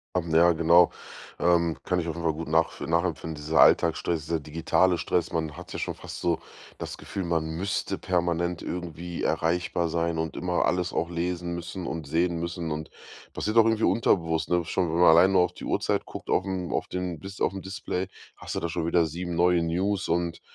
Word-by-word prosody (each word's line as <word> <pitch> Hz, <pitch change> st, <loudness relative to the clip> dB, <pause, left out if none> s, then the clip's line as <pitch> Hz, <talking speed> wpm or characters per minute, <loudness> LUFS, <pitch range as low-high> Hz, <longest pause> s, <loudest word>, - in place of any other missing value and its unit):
Haben, 85 Hz, -2 st, -1 dB
ja, 85 Hz, +1 st, +6 dB
genau 85 Hz, +2 st, +5 dB, 0.5 s
ähm, 85 Hz, -3 st, +2 dB
kann 90 Hz, -1 st, 0 dB
ich 85 Hz, -, -3 dB
offenbar 85 Hz, -1 st, -1 dB
gut 80 Hz, +2 st, -6 dB
nachv 80 Hz, +1 st, +1 dB
nachempfinden. 85 Hz, -1 st, -1 dB
Dieser 75 Hz, +2 st, -1 dB
Alltagsstress, 80 Hz, -3 st, +3 dB
der 80 Hz, 0 st, -1 dB
digitale 80 Hz, +4 st, +1 dB
Stress. 85 Hz, +1 st, -1 dB
Man 80 Hz, -3 st, -2 dB
hat -, -, -10 dB
ja -, -, -5 dB
schon -, -, -3 dB
fast -, -, -9 dB
so 85 Hz, -2 st, 0 dB, 0.4 s
das -, -, -6 dB
Gefühl, 95 Hz, -1 st, -5 dB
man 85 Hz, -2 st, 0 dB
müsste 95 Hz, +5 st, -2 dB
permanent 85 Hz, -1 st, -1 dB
irgendwie 85 Hz, 0 st, -5 dB
erreichbar 85 Hz, +1 st, 0 dB
sein 85 Hz, 0 st, -1 dB
und 80 Hz, 0 st, -3 dB
immer 90 Hz, -1 st, 0 dB
alles 90 Hz, 0 st, 0 dB
auch 85 Hz, +1 st, -1 dB
lesen 85 Hz, 0 st, -2 dB
müssen 85 Hz, +1 st, -5 dB
und 80 Hz, -4 st, -4 dB
sehen 85 Hz, +3 st, +1 dB
müssen. 85 Hz, -1 st, -4 dB
Und 80 Hz, +1 st, -4 dB, 0.4 s
passiert 105 Hz, +8 st, -2 dB
auch 115 Hz, -, +8 dB
irgendwie 110 Hz, 0 st, +1 dB
unterbewusst, 80 Hz, -8 st, +2 dB
ne? 90 Hz, -1 st, +1 dB
Schon 90 Hz, -1 st, 0 dB
wenn 85 Hz, -, 0 dB
man 90 Hz, -, +7 dB
alleine 95 Hz, +3 st, +6 dB
nur 90 Hz, -2 st, +5 dB
auf 90 Hz, -, -2 dB
die -, -, -9 dB
Uhrzeit -, -, 0 dB
guckt -, -, -7 dB
aufm 95 Hz, -1 st, -1 dB
auf -, -, -1 dB
den 90 Hz, -3 st, -4 dB
Dis 95 Hz, +4 st, -9 dB
aufm 95 Hz, 0 st, 0 dB
Display, 95 Hz, -1 st, -4 dB, 0.3 s
hast -, -, -7 dB
du -, -, 0 dB
da -, -, -2 dB
schon 85 Hz, 0 st, -2 dB
wieder 85 Hz, -1 st, +3 dB
7 85 Hz, +2 st, -4 dB
neue 90 Hz, 0 st, +3 dB
News 95 Hz, +4 st, 0 dB
und 85 Hz, 0 st, -1 dB
85 Hz, 200 wpm, -27 LUFS, 80-90 Hz, 0.5 s, auch